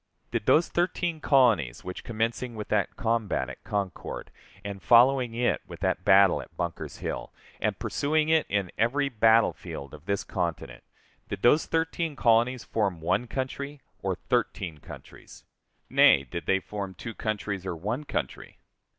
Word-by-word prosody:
Did - - -2
those 165 - +5
thirteen 175 -2 -1
colonies 115 - +3
which, 90 0 -7
commencing 115 +2 -2
with 105 -1 -6
that 105 -2 0
combat 115 -3 -1
at - - -13
Concord, 100 -4 -4 0.3
and 100 -1 -5
following 125 +1 +5
it 120 0 +1
with - - -10
that - - 0
battle 95 0 +5
at - - -15
Bunker's 85 -1 -4
Hill, - - -5 0.3
and - - -1
pursuing 155 +2 0
it 160 0 +3
in 100 -3 -1
every 140 +5 +2
battlefield 110 - +2
of 75 +2 -13
this 100 -1 0
continent, 85 -9 -4 0.5
did - - -5
those 150 +6 +5
thirteen 165 -1 -1
colonies 120 0 +3
form 100 -6 -1
one 95 +9 0
country 140 +3 -4 0.2
or - - -1
thirteen 80 -5 -2
countries? - - -13 0.4
Nay, 70 - +6
did 85 +6 -7
they 95 - +3
form 100 -1 -6
two 115 +6 -7
countries, 105 -3 -3
or 95 -2 -3
one 110 - -3
country? - - -5
110 Hz, 150 wpm, -27 LUFS, 95-130 Hz, 0.5 s, Nay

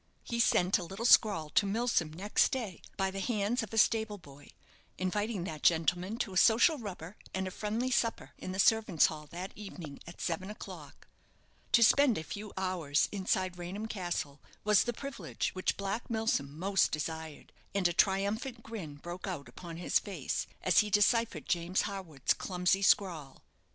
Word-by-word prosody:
He 235 - -3
sent 190 -4 +3
a - - -5
little 195 +6 -6
scrawl 195 -11 +5
to 200 - +3
Milsom 210 -6 +1
next 195 +6 +1
day, 225 - -4 0.2
by 190 -1 0
the 195 - -5
hands 215 +2 0
of 220 - -6
a 225 - -4
stable 220 -1 +3
boy, 145 -5 -15 0.5
inviting 205 +1 -1
that 155 -4 -6
gentleman 180 +5 +2
to 200 -5 -3
a - - -2
social 240 - +5
rubber 195 -3 -8 0.2
and 190 0 -1
a - - -5
friendly 220 +6 -2
supper 235 -3 0
in 185 - -5
the 190 - -5
servants' 215 -5 +4
hall 150 -1 -3
that 180 +5 -6
evening 175 -8 -9
at 170 - -11
seven 175 +3 -2
o'clock. 215 - -10 0.7
To 235 - +7
spend 260 0 +5
a 160 - -3
few 205 +4 -7
hours 175 -6 0
inside 185 -2 -1
Raynham 185 +5 -5
Castle 175 -8 -4 0.2
was 210 0 +4
the 240 - 0
privilege 275 +1 -4
which 185 - -1
Black 200 +3 -3
Milsom 220 -11 -1
most 195 +3 +2
desired, 160 0 -5 0.2
and 195 -3 +3
a 175 - -2
triumphant 200 +8 0
grin 195 -10 -7
broke 175 +6 -7
out 165 -7 -5
upon 170 -2 -9
his 175 - +2
face, - - -3 0.2
as - - +5
he 210 - +2
deciphered 210 +3 +2
James 175 +1 +1
Harwood's 185 -9 -1
clumsy 180 +1 0
scrawl. 170 -8 +1
190 Hz, 170 wpm, -31 LUFS, 170-215 Hz, 0.7 s, To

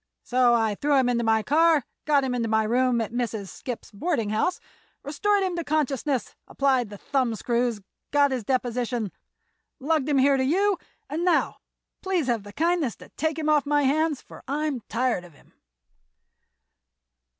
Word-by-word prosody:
So 245 -1 +3
I 225 -2 +1
threw 285 +7 +1
him 255 -2 +3
into 235 -1 +1
my 220 -1 +2
car, 315 0 +3 0.2
got 290 -2 +3
him 260 -1 -1
to 235 -2 -1
my 220 0 +2
room 245 +2 +2
at 220 - -4
Mrs. 230 -5 -3
Skipp's 245 -3 -7
boarding 225 - -1
house, 220 +12 0 0.4
restored 400 +8 +1
him 370 -2 -1
to 340 - -2
consciousness, 285 -4 -1
applied 260 -5 +1
the 205 - -9
thumbscrews, 235 -2 -1 0.3
got 285 -1 +3
his 255 -3 -2
deposition, 245 -3 -1 0.7
lugged 300 0 0
him 285 - +2
here 275 +1 +4
to 260 - +1
you, 380 +7 +2 0.3
and 320 +4 -3
now—please 360 -1 -1
have 240 -4 0
the 205 +1 -11
kindness 320 - 0
to - - -15
take 315 0 -2
him 310 -1 -2
off 300 -2 +3
my 290 0 +2
hands, 300 +1 +1
for - - -13
I'm 290 -1 -1
tired 235 -4 0
of 175 -4 -15
him." - - -24
265 Hz, 165 wpm, -25 LUFS, 235-300 Hz, 0.7 s, here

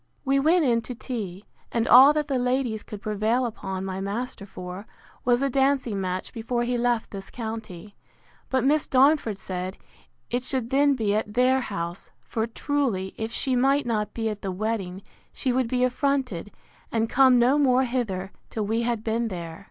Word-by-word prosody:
We 275 +1 +3
went 320 +3 +4
in 235 -3 +3
to 250 +2 -6
tea; 205 -6 -5 0.3
and 230 -1 0
all 265 +4 +9
that 300 -1 -1
the 270 -3 0
ladies 250 -3 0
could 205 -1 -9
prevail 215 +4 +1
upon 190 -5 -4
my 190 0 -4
master 205 +1 -4
for, 185 +2 -8 0.4
was 245 +2 +3
a - - +3
dancing 265 -6 +1
match 185 0 -3
before 240 +1 -2
he 245 +1 -1
left 240 -1 0
this 195 -1 -7
county: 220 -4 -7 0.6
But 260 -1 +1
Miss 295 +3 +2
Darnford 265 -5 +3
said, 185 0 -5 0.5
It 245 +1 0
should 255 -1 -3
then 280 +1 +4
be 215 -5 0
at 210 0 -2
their 255 +1 +4
house; 175 -5 -5
for, 225 0 -2
truly, 230 -7 -1
if 220 0 -4
she 255 +2 0
might 275 +3 +3
not 215 -3 -1
be 225 -1 -1
at 210 -1 -4
the 195 - -3
wedding, 195 -2 -3 0.3
she 260 - -1
would 255 -1 +1
be 250 +1 +1
affronted, 255 - 0 0.4
and 225 0 +1
come 260 +1 +5
no 250 +5 +4
more 260 -2 +4
hither, 215 -7 -2 0.2
till 215 -2 -2
we 225 +3 0
had 235 -2 -1
been 230 +1 0
there. 170 -5 -6
235 Hz, 185 wpm, -25 LUFS, 205-255 Hz, 0.6 s, all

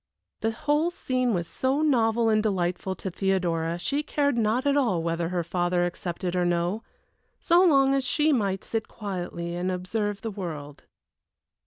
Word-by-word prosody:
The 225 - 0
whole 295 +8 +1
scene 255 -7 -1
was 170 -5 -1
so 270 +4 0
novel 235 -5 +3
and 215 -1 +3
delightful 190 -2 -1
to 190 +1 -5
Theodora 170 -3 0
she 280 +11 -1
cared 290 -2 0
not 230 +3 +1
at 285 0 +3
all 220 -13 +2
whether 165 0 -1
her 175 -1 -1
father 175 +1 0
accepted 175 0 -3
or 180 - +2
no, 175 +4 0 0.6
so 345 +1 +4
long 275 -6 +5
as 275 -1 +1
she 300 +3 +2
might 195 -6 0
sit 225 -1 -3
quietly 175 -4 -5
and 180 +2 -1
observe 200 +3 -2
the 225 - -4
world. 155 -7 -7
200 Hz, 165 wpm, -26 LUFS, 175-255 Hz, 0.6 s, long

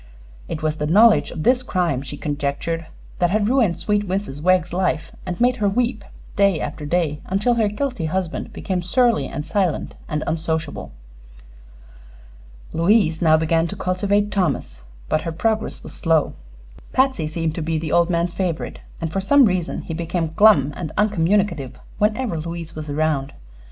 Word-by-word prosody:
It 155 - -5
was 155 0 0
the 150 - -2
knowledge 215 +7 +5
of 155 - -5
this 250 +5 +4
crime, 175 - 0
she 145 +1 -7
conjectured, 150 +3 -3 0.3
that 175 - +3
had 205 +2 +1
ruined 230 -9 +2
sweet 205 +4 0
Mrs. 185 -6 -3
Wegg's 180 0 +2
life 165 -3 -1 0.2
and 180 -1 -4
made 245 +1 +3
her 205 -3 +2
weep 235 0 0 0.3
day 200 -5 +3
after 150 -2 -5
day 155 -3 0
until 200 +6 +1
her 225 -3 +2
guilty 245 - -2
husband 175 +1 -3
became 185 -2 -3
surly 235 +5 +2
and 150 - -5
silent 185 -4 -1
and 150 -1 -2
unsociable. 160 -1 -3 1.8
Louise 170 -1 +3
now 160 -2 +5
began 165 +1 +1
to 195 - -6
cultivate 200 +2 0
Thomas, 140 - -1 0.3
but 155 - +1
her 165 - -4
progress 220 +6 -1
was - - -9
slow. 165 -3 +1 0.6
Patsy 260 - +2
seemed 160 0 -2
to 165 - -4
be 160 +1 -1
the 155 0 -3
old 170 0 +3
man's 170 0 0
favorite, 175 -4 -3 0.2
and 165 -1 -4
for 195 - 0
some 280 +7 +5
reason 185 -4 -1
he 165 - -5
became 165 0 -2
glum 155 -10 +5
and 160 -4 -5
uncommunicative 190 - +1 0.2
whenever 210 -3 0
Louise 165 0 -6
was 155 -1 -7
around. 145 -2 0
170 Hz, 165 wpm, -21 LUFS, 155-205 Hz, 1.8 s, knowledge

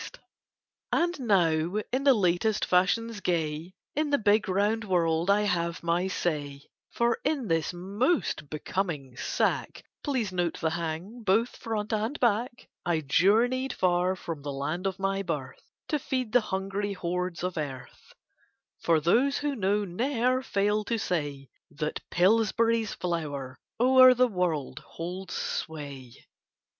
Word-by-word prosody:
] - - -65 0.3
And 345 -1 +1
now 175 -7 +2 0.2
in 265 +2 -1
the 275 -2 +7
latest 200 +2 +1
fashions 205 +5 +1
gay 165 0 -2 0.2
In 305 +1 0
the 285 - +3
big 215 -1 +2
round 205 +4 +1
world 170 -3 +1
I 205 +1 +5
have 170 -4 -1
my 170 +2 +1
say, 145 -6 -2 0.3
For 235 0 +1
in 285 -5 0
this 165 -1 +1
most 195 - -1
becoming 155 -5 -3
sack, - - -1 0.2
Please 255 -9 -1
note 175 -2 -1
the 160 -1 0
hang 170 +8 -4
both 220 +4 +2
front 220 -1 -3
and 220 +7 -1
back, 235 +1 0 0.2
I 170 -2 0
journey 230 - +3
far 180 -4 +1
from 165 -4 -6
the 145 0 -4
land 155 +7 -2
of 190 -1 -3
my 195 0 -1
birth 145 -9 -5 0.2
To 300 - +1
feed 255 -4 -2
the 245 +1 +5
hungry 195 0 -2
hordes 180 -1 -3
of 180 0 -2
Earth; 135 -5 -7 0.7
For 165 -2 +3
those 240 - +3
who 290 -1 -1
know 205 -1 +1
ne'er 250 +6 0
fail 210 -2 0
to 230 - 0
say 145 -9 -3 0.2
That 150 +1 -3
Pillsbury's 225 +3 +2
flour 145 -7 -4 0.2
o'er 255 +1 +7
the 250 +1 +4
world 180 - -2
holds 180 +2 -7
sway. 140 -6 -5
190 Hz, 140 wpm, -28 LUFS, 165-230 Hz, 0.7 s, the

